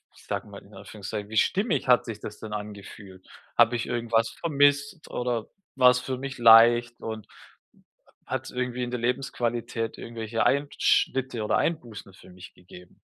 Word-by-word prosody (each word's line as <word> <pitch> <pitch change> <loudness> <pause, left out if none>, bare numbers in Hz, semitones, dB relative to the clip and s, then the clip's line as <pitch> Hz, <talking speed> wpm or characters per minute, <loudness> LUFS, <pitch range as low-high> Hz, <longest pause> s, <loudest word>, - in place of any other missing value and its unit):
ich - - -19
sage - - -4
mal - - -11
in - - -19
Anführungszeichen 105 0 -7
„wie 110 - -4
stimmig 185 - +1
hat 125 -1 +4
sich 110 -3 -6
das 105 0 -9
denn 110 -1 -8
angefühlt? 100 -2 -9 0.3
Habe 120 +1 +5
ich 120 - -2
irgendwas 115 -1 0
vermisst 145 +1 +1
oder 120 -2 -2 0.3
war 125 -1 +7
es 125 - 0
für 130 0 -4
mich 135 0 -6
leicht 120 +1 +6
und 110 -2 -6 1.0
hat's - - -4
irgendwie 125 0 -3
in 120 - -4
der 125 - -3
Lebensqualität 120 -2 -2
irgendwelche 115 -1 -3
Einschnitte 130 -3 +1
oder - - +1
Einbußen 115 - -3
für 95 - -17
mich 90 +1 -13
gegeben?” 90 0 -16
120 Hz, 160 wpm, -26 LUFS, 110-125 Hz, 1.0 s, war